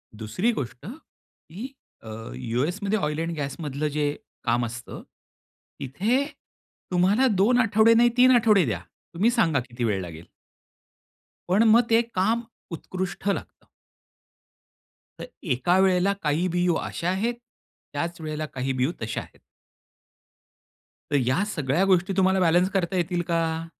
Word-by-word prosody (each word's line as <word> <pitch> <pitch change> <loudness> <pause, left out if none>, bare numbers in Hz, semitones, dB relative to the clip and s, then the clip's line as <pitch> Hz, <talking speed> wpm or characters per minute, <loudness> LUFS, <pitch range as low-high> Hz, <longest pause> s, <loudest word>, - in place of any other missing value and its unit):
दुसरी 110 - -1
गोष्ट, 125 - -5
की 250 - -11 0.3
अ, 110 - -8
यू 115 - -2
एसमध्ये 200 +4 -1
ऑइल 150 -2 -2
एंड 165 +1 -2
गॅसमधलं 145 +1 -3
जे 145 0 0 0.3
काम 120 0 +1
असतं, 120 +1 -8 0.8
इथे 215 - 0 0.7
तुम्हाला 195 +9 +3
2 245 +5 +4
आठवडे 225 -1 +5
नाही 240 +1 +5
3 255 +1 +7
आठवडे 215 -7 +4
द्या. 105 -8 -2 0.3
तुम्ही 210 +8 +2
सांगा 165 - +2
किती 120 0 -5
वेळ 100 -4 0
लागेल? 85 -1 -9 1.2
पण 200 +5 +4
मग 235 +2 +6
ते 225 +1 +5
काम 230 +1 0 0.3
उत्कृष्ट 185 +3 -5
लागतं. - - -4 1.5
तर - - -5 0.3
एका 175 +9 +2
वेळेला 190 +1 +3
काही 155 +4 +1
बियू 175 -1 +1
अशा 170 +2 -3
आहेत, 215 +6 0 0.6
त्याच 170 +4 -3
वेळेला 155 0 -4
काही 130 +1 -2
बियू 130 +4 0
तशा 110 0 -3
आहेत. - - -16 1.7
तर - - +2
या 155 +10 +2
सगळ्या 150 +5 +1
गोष्टी 190 0 +2
तुम्हाला 190 0 +3
बॅलन्स 175 +1 +3
करता 185 -1 -1
येतील 175 0 0
का? 165 -1 -1
175 Hz, 135 wpm, -25 LUFS, 140-200 Hz, 1.7 s, 3